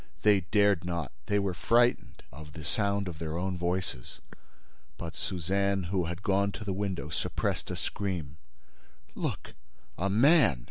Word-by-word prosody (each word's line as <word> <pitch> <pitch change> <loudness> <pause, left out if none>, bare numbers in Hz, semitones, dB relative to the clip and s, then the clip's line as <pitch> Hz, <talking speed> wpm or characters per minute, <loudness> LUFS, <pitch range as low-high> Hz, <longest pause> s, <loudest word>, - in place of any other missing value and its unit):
They 105 -2 +6
dared 100 -4 +4
not; 85 -5 -3 0.2
they 105 - +2
were 100 -2 0
frightened 120 +6 +2
of 75 -1 -11
the 75 -2 -8
sound 100 +3 0
of 85 -3 -6
their 80 0 -3
own 95 +1 -1
voices. 90 -7 -3 0.8
But 80 -2 -6
Suzanne, 95 +2 0
who 95 -3 +1
had 85 +4 -5
gone 100 +1 +2
to - - -6
the 100 - -1
window, 95 -7 -3
suppressed 80 - -2
a - - -2
scream: 90 -9 -3 0.8
"Look!—A 65 +9 -5
man! 115 - +5
95 Hz, 145 wpm, -30 LUFS, 80-100 Hz, 0.8 s, They